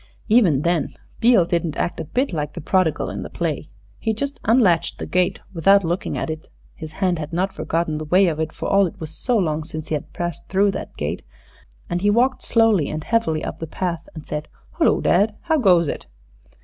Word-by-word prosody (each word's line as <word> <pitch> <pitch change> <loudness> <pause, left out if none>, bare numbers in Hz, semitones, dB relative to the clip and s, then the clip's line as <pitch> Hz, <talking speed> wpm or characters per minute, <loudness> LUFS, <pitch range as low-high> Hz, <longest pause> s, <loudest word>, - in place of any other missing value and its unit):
Even 185 - +4
then 170 -2 0 0.2
Beale 230 -6 +5
didn't 170 -2 -1
act 170 - -2
a 165 - -3
bit 255 - -1
like 150 -2 -3
the - - -6
prodigal 180 -1 +1
in - - -5
the - - -6
play. 155 -3 -3 0.3
He 220 -1 -1
just 280 +5 -4
unlatched 205 -8 +3
the - - -5
gate 180 0 +1 0.2
without 195 +4 +5
looking 175 +2 -2
at - - -2
it 155 0 -8 0.2
his 155 -1 -9
hand 180 -2 0
had 155 0 -5
not 185 +3 -1
forgotten 155 0 -1
the 155 - -5
way 185 +6 +4
of 160 -3 -1
it, 160 0 -1
for - - -5
all 195 -1 +4
it - - -11
was 160 -1 -6
so 245 +8 0
long 160 -5 0
since 155 -1 -7
he - - -1
had 150 - -3
passed 175 -3 -5
through 195 +1 +3
that - - -7
gate. - - -3 0.7
And 175 0 -2
he 205 - +3
walked 245 +5 +2
slowly 225 -8 +3
and 155 0 -4
heavily 165 -9 0
up - - -5
the 165 - -5
path 170 0 -3
and 155 - -8
said, 150 0 -4 0.3
"Hullo, - - +3
dad! 205 +4 +3
how 320 -2 +1
goes 180 - +4
it?" - - -5
175 Hz, 215 wpm, -22 LUFS, 155-200 Hz, 0.7 s, Beale